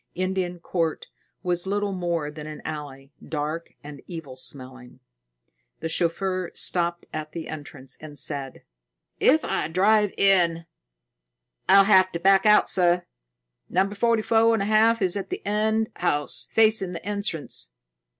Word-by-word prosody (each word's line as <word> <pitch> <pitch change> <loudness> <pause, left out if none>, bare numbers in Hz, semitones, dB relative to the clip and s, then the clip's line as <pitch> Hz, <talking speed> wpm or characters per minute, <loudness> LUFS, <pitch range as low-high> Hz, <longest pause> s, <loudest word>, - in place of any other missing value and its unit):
Indian 185 -1 -2
Court 165 -2 -2 0.4
was 180 0 -1
little 205 0 -1
more 170 -5 -2
than 150 0 -9
an 155 0 -9
alley, 145 -3 -7
dark 155 +2 -4
and 145 -1 -10
evil 160 -7 -8
smelling. 130 -1 -6 0.8
The 165 - -4
chauffeur 180 +2 -1
stopped 170 -1 +1
at 155 0 -5
the 165 -2 -6
entrance 145 -4 -7
and 150 -2 -10
said: 140 -2 -5 0.6
"If 310 +4 +4
I - - -1
drive 205 +4 +3
in, 170 -4 +3 1.0
I'll 195 0 +8
have 190 -2 +5
to 170 - -3
back 195 +3 +4
out, 210 0 +6
sir. 175 -1 +2 0.6
Number 195 +2 +1
forty 230 +1 +1
four 225 0 +4
and 205 - -1
a - - -2
half 220 +1 +3
is 180 -2 +1
the 200 -1 -5
end 220 +2 0
house, 145 -4 -2
facing 215 -4 +3
the 170 - -8
entrance." 200 - -3
175 Hz, 140 wpm, -25 LUFS, 155-200 Hz, 1.0 s, I'll